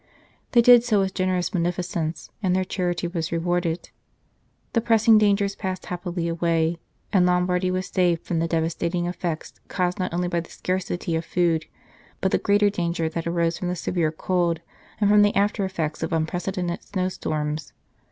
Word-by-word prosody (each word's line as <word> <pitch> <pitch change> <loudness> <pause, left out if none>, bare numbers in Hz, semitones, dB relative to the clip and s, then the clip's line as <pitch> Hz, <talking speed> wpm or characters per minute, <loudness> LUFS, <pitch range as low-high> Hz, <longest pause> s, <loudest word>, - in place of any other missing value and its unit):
They 235 -1 +6
did 245 -1 +8
so 220 -4 +2
with 190 -1 0
generous 185 -1 0
munificence, 175 -2 -2
and 185 -3 +1
their 190 - +2
charity 175 -2 -2
was 170 -2 -3
rewarded; 170 0 -1 0.8
the 230 - +2
pressing 225 -1 +5
dangers 200 -1 +2
passed 185 -1 -4
happily 175 -1 -3
away, 165 0 0 0.3
and 190 -3 +5
Lombardy 180 +1 +2
was 185 0 -1
saved 175 -3 +1
from 170 - -1
the 165 - +1
devastating 170 +1 -1
effects 175 -2 -4
caused 180 -1 -1
not 185 - -1
only 175 +1 -1
by 175 -1 0
the 170 - -7
scarcity 180 -2 -2
of 160 - -1
food, 165 -2 +1 0.5
but 190 - 0
the - - +2
greater 205 0 +3
danger 170 -4 -1
that 165 +1 -4
arose 170 0 0
from 180 - -3
the 180 - -1
severe 170 -2 0
cold 170 0 0 0.4
and 205 - +3
from 210 0 +6
the 205 0 +3
after 200 0 +2
effects 160 -5 -3
of 160 - -2
unprecedented 175 +2 -2
snow 185 -2 -2
storms. 155 -4 -3
180 Hz, 170 wpm, -24 LUFS, 170-185 Hz, 0.8 s, did